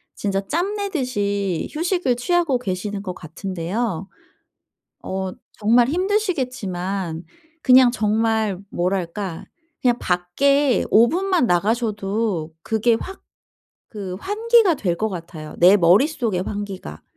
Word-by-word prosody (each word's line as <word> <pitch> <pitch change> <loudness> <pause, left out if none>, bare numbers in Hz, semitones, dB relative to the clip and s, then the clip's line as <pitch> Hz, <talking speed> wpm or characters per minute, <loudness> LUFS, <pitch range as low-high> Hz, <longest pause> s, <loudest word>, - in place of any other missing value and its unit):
진짜 195 -1 -1
짬 360 - -1
내듯이 205 - -2
휴식을 335 -4 0
취하고 315 +2 +1
계시는 200 -1 -4
것 185 -3 -4
같은데요. 185 +3 -4 1.0
어 190 0 -3 0.2
정말 235 +3 +3
힘드시겠지만 250 - -2 0.4
그냥 255 -1 +7
정말 220 -3 0
뭐랄까 180 0 -2 0.4
그냥 245 -1 +3
밖에 255 +11 +2
5 230 +2 +6
분만 365 -3 +1
나가셔도 205 -3 0
그게 220 +6 +1
확 385 - -8 0.7
그 195 -3 -5
환기가 440 -2 +3
될 180 -10 -1
것 220 +4 -1
같아요. 165 -4 -8
내 180 +4 +7
머릿속의 205 - +2
환기가. 195 - -6
210 Hz, 230 characters per minute, -21 LUFS, 185-265 Hz, 1.0 s, 그냥